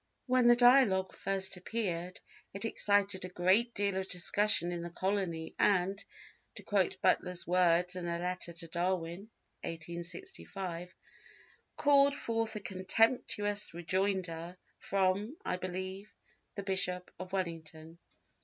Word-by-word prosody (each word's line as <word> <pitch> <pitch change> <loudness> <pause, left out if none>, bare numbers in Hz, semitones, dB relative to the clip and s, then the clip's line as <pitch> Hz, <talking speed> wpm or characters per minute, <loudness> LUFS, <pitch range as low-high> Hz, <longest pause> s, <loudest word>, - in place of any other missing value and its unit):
When 255 -2 +3
the 240 - +8
Dialogue 245 -7 +5
first 190 -1 0
appeared 180 -3 -4 0.4
it 200 - -2
excited 200 -3 +1
a 185 - -5
great 190 +7 +2
deal 200 -1 0
of 190 0 -3
discussion 180 0 +3
in 175 -1 -4
the 170 - -5
colony 180 -3 -2
and, 195 +1 +2 0.5
to - - -8
quote - - 0
Butler's 180 -1 +2
words 180 0 +2
in 180 -1 -4
a 170 0 -1
letter 180 0 -3
to 165 0 -8
Darwin 175 +3 -3 0.3
(1865), 175 - -6 0.8
"called 280 -1 +5
forth 225 -4 -2
a - - -3
contemptuous 205 +1 +1
rejoinder 180 -1 -2 0.2
from 200 - 0
(I 180 - -1
believe) 185 +2 -6 0.4
the 200 - -5
Bishop 190 -2 0
of 185 0 -7
Wellington." 165 -3 -5
185 Hz, 125 wpm, -32 LUFS, 175-205 Hz, 0.8 s, the